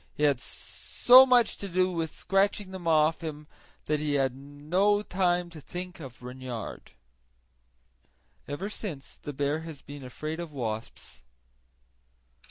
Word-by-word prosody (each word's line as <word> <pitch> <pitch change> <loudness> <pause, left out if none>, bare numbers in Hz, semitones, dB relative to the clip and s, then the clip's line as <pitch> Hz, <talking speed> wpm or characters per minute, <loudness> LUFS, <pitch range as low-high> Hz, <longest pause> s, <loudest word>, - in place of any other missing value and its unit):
He 150 - -2
had 140 -4 +4
so 250 - +5
much 245 -3 +4
to 200 - -5
do 185 +1 +2
with 165 -3 -3
scratching 195 0 +1
them 185 -3 -6
off 155 0 +4
him 150 -2 -6 0.4
that 150 0 +1
he 150 -1 0
had 135 -2 +1
no 155 +10 +1
the 180 -2 +1
to 160 -2 -10
think 180 +4 -7
of 130 -5 -10
Reynard. 125 -2 -7 1.5
Ever 145 +8 -3
since 180 -10 -7
the 145 - -5
bear 145 +2 0
has 160 -4 -9
been 145 -1 -9
afraid 155 +6 -5
of 170 -2 -5
wasps. 115 -5 -5
155 Hz, 140 wpm, -28 LUFS, 140-185 Hz, 1.5 s, so